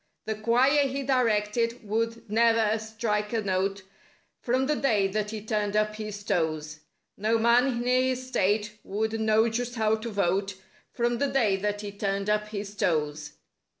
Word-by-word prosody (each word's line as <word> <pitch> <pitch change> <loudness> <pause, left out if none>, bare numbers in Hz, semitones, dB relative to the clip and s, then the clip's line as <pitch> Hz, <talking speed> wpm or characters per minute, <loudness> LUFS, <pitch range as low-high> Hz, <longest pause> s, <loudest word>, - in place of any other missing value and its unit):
The 220 - -1
choir 250 +7 +3
he 275 +1 -3
"directed" 230 -2 0
would 230 +2 -2
ne'er 225 0 +3
strike 220 -1 -2
a 225 - +1
note— 195 0 -1 0.6
From 255 +2 +1
the 300 +2 +1
day 220 -9 +2
that 210 +1 -2
he 215 -1 -6
turned 210 -2 -1
up 215 0 +1
his 210 -1 -6
toes. 155 -5 -1 0.4
No 220 +3 +1
man 235 +3 +4
in 240 -2 -1
his 255 0 +1
state 210 -2 0
would 220 +2 -2
know 220 +1 +3
just 240 +2 -3
how 220 -1 +2
to 225 +2 -6
vote— 195 -1 0 0.4
From 240 0 0
the 280 - +2
day 230 -8 +2
that 205 +1 -2
he 205 -1 -6
turned 200 0 -1
up 210 0 0
his 205 -1 -6
toes. 150 -5 -1
215 Hz, 165 wpm, -27 LUFS, 205-235 Hz, 0.6 s, man